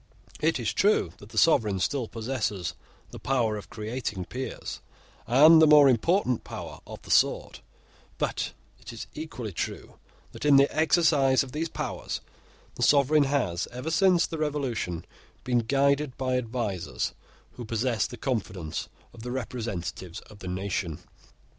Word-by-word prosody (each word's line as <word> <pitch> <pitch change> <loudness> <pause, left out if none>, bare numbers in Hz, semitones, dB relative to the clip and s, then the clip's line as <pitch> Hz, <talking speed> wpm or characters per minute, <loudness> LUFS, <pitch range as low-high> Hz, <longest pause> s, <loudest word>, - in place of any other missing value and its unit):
It 160 -2 +1
is 110 -2 -1
true 195 - +2
that 100 - -13
the 110 - -10
sovereign 110 -8 +4
still 125 +5 -1
possesses 110 -6 -3 0.4
the - - -9
power 120 -5 +1
of 105 - -8
creating 110 -4 -4
peers, 130 +6 -6 0.5
and 155 +7 +7
the 160 - +7
more 150 -2 +8
important 130 - +2
power - - -8
of - - -10
the - - -7
sword: - - +2 0.6
but - - -2 0.3
it - - -10
is 115 - -7
equally 140 -8 -6
true 85 - -5 0.3
that - - -9
in 145 -1 +6
the 140 +1 +4
exercise 155 -5 +4
of 130 - -10
these 160 +3 -2
powers - - -4 0.5
the - - -9
sovereign 145 +1 +5
has, 125 -12 0
ever 125 +6 -4
since 175 +2 +4
the 160 - -6
Revolution, 135 - -2 0.4
been 125 -1 +2
guided 140 +3 +1
by 130 -1 0
advisers 115 -7 -2 0.4
who 125 - -9
possess 115 0 0
the 120 - -9
confidence 100 - -3 0.2
of 115 - -12
the 125 - -6
representatives 110 -7 -5
of 105 - -16
the 95 - -8
nation. 90 -3 -3
125 Hz, 150 wpm, -27 LUFS, 105-145 Hz, 0.6 s, more